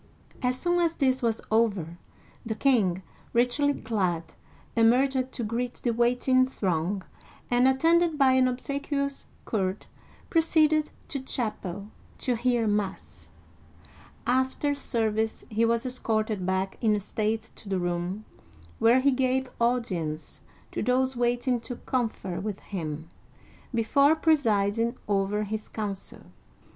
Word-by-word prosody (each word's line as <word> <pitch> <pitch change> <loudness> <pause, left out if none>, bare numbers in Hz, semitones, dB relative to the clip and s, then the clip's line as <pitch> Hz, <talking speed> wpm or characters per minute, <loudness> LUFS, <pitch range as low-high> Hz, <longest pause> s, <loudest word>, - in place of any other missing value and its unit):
As 250 -1 0
soon 350 0 +1
as 335 -1 +1
this 260 -2 +2
was 230 -2 0
over, 200 -7 +1 0.4
the 225 -2 -3
king, 205 -9 +2 0.3
richly 250 +4 +2
clad, 185 -7 -2 0.4
emerged 255 +3 +3
to 240 - -4
greet 235 +3 -2
the 240 - -1
waiting 250 +2 +3
throng, 185 -4 -1 0.5
and, 245 +1 +5
attended 325 +4 +3
by 270 -2 +5
an 260 0 +4
obsequious 280 +2 -2 0.2
court, 190 -2 -1 0.4
proceeded 310 -2 +3 0.2
to 280 - -2
chapel 210 -6 -4 0.3
to 250 - 0
hear 240 0 +1
mass. 205 -2 -3 1.0
After 260 +3 +1
service 220 -5 -1
he 225 +2 +2
was 230 +2 +1
escorted 215 -6 -1
back 190 +1 -1
in 215 -2 +3
state 215 +2 -2
to 205 - -11
the 190 - 0
room 175 +3 -2 0.5
where 240 +3 +5
he 280 +1 +4
gave 260 0 0
audience 185 - -1 0.3
to - - -3
those 255 +2 +1
waiting 245 +1 +1
to 240 +2 -6
confer 225 -9 -2
with 205 -1 -4
him, 160 -5 -5 0.6
before 280 +6 +4
pre 320 0 +4
siding 225 -3 +1
over 205 +1 +1
his 215 +1 -4
council. 205 -3 -5
235 Hz, 125 wpm, -27 LUFS, 205-260 Hz, 1.0 s, and